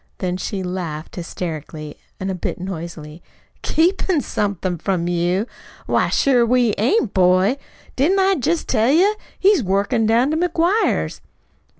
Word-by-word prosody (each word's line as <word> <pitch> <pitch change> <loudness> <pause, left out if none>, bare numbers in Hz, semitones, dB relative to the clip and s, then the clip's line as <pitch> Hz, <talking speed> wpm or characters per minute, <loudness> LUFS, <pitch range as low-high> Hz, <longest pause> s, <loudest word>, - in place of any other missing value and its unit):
Then 180 -1 -2
she 190 +1 -4
laughed, 170 -4 -5
hysterically, 155 -3 -6 0.2
a 190 - -4
bit 180 - -4
noisily. 170 -3 -7 0.4
"Keepin' 350 0 +1
somethin' 190 -7 -2
from 175 -1 -1
you? 175 +3 0 0.4
Why, - - +1
sure 255 -3 +3
we 240 -2 +2
ain't, 240 - +1
boy! 185 +6 +3 0.4
Didn't 320 +9 +2
I 385 0 +4
jest 335 +1 -1
tell 225 -1 +2
you? 365 +9 +4 0.2
He's 395 -3 +4
workin' 205 +3 +1
down 235 +6 +3
to 315 - 0
McGuire's." 350 +5 +1
205 Hz, 130 wpm, -20 LUFS, 180-295 Hz, 0.4 s, I